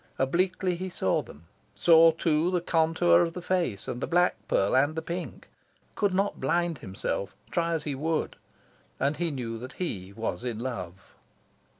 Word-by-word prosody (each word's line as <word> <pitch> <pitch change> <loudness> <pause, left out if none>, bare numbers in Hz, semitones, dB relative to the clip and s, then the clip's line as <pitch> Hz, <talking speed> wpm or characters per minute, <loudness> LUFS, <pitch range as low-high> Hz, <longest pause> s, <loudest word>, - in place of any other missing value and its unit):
Obliquely, 180 +6 +1
he 185 +1 -4
saw 95 - 0
them; 75 +2 -14 0.3
saw, 165 -1 +7
too, 160 0 +1
the 180 -1 +1
contour 165 0 +3
of 165 -1 0
the 180 - -6
face, 175 - -1
and 120 - -4
the - - -1
black 175 +1 +3
pearl 95 - +2
and 145 +4 +3
the 160 - -2
pink; 170 - -6 0.5
could 205 -1 +1
not 195 +2 0
blind 170 +2 0
himself, 95 -1 -4 0.2
try 170 -1 0
as 160 -2 -1
he 145 - -2
would. 155 +4 -1 0.6
And 140 +2 +1
he 170 +1 0
knew 120 -6 -4
that 125 +2 -8
he 100 - -4
was 110 +3 -4
in 120 -3 -3
love. 95 -7 -6
160 Hz, 175 wpm, -28 LUFS, 120-175 Hz, 0.6 s, saw